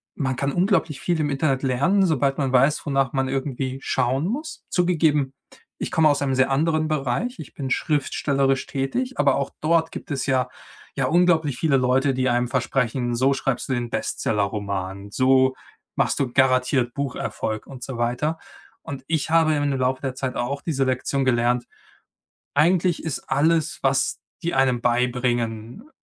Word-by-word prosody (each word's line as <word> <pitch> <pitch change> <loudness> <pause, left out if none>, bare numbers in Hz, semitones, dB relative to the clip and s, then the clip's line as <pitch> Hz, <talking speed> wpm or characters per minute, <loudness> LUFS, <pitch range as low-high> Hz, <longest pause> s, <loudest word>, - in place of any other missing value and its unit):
man 130 -3 -1
kann 140 +1 0
unglaublich 175 -6 +1
viel 175 -1 0
im 145 - 0
Internet 135 -1 0
lernen, 145 +10 +2
sobald 140 -5 +1
man 135 -3 0
weiß, 135 +4 +3
wonach 135 -3 0
man 135 -1 0
irgendwie 135 -1 -3
schauen 130 +6 0
muss. 300 +9 -5
Zugegeben, 160 -6 +2 0.5
ich - - -3
komme 160 -1 +4
aus 145 -1 +1
einem 135 -2 0
sehr 130 +1 +2
anderen 155 +3 +1
Bereich. 155 - -1
Ich 155 - -9
bin 135 -2 -5
schriftstellerisch 140 -2 0
tätig, 195 - -2
aber 140 -2 +4
auch 140 - -2
dort 160 +1 +2
gibt - - -8
es 140 -2 -1
ja 130 -1 +1 0.5
ja 135 - 0
unglaublich 160 -4 +2
viele 150 -4 +3
Leute, 130 +2 +2
die 130 0 0
einem 120 0 +1
versprechen: 125 -1 0
„So 130 +3 +3
schreibst 135 -1 -2
du - - +1
den 120 -1 -2
Bestseller-Roman, 100 -1 -2
so 130 +2 +3 0.4
machst - - +1
du 130 -4 0
garantiert 130 -2 +2
Bucherfolg“ 125 -5 -3
und 130 -2 -10
so 125 -1 -6
weiter. 125 +7 -1 0.5
Und 135 -2 -7
ich 160 -2 -1
habe 160 -1 +4
im 145 -1 0
Laufe 130 0 0
der 135 -2 -3
Zeit 130 -1 -3
auch 135 +4 -2
diese 140 -5 0
Lektion 130 +1 0
gelernt: 120 -1 +2 0.9
Eigentlich 175 +1 +2
ist 160 -4 -3
alles, 160 +1 +1
was 135 0 +1 0.2
die 170 - -1
einem 130 -2 +3
beibringen, 120 - -1
135 Hz, 165 wpm, -23 LUFS, 125-150 Hz, 0.9 s, komme